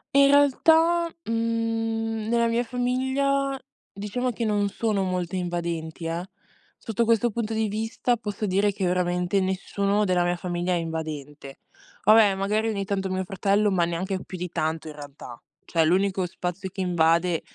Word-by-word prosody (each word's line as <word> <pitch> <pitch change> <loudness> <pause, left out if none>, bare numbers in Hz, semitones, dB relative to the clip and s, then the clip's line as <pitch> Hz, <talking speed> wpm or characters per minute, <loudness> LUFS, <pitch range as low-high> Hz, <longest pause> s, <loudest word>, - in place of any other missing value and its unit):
In 280 0 +7
realtà, 320 +4 +4 0.2
mhmm, 225 -1 -1
nella 235 0 +3
mia 230 +1 +1
famiglia, 265 +3 0 0.3
diciamo 210 +6 -3
che 230 0 -3
non 205 -2 +1
sono 210 -1 -1
molte 185 -1 -2
invadenti, 170 -2 -3
eh, 170 +3 -3 0.5
sotto 225 0 -1
questo 230 +1 +2
punto 220 0 -3
di 220 0 +1
vista, 225 +3 -1
posso 210 -1 -4
dire 200 +1 +2
che, 195 -1 -3
veramente, 180 +1 +1
nessuno 200 +2 0
della 180 -2 +2
mia 175 0 +1
famiglia 175 0 -2
è - - +2
invadente. 155 -4 -5 0.4
Vabbè, 215 -2 +6
magari, 210 +3 0
ogni 200 -2 -2
tanto, 195 -1 -2
mio 185 0 -1
fratello, 200 +2 +1
ma 175 -3 +2
neanche 185 +3 -3
più 185 - -8
di 180 +1 -4
tanto, 160 0 -2
in 155 - -7
realtà. 145 -5 -10 0.2
Cioè, 165 -1 +2
l'unico 185 +2 +2
spazio 180 +2 -5
che 190 +1 -6
invade 170 -1 +2
195 Hz, 155 wpm, -25 LUFS, 175-225 Hz, 0.5 s, In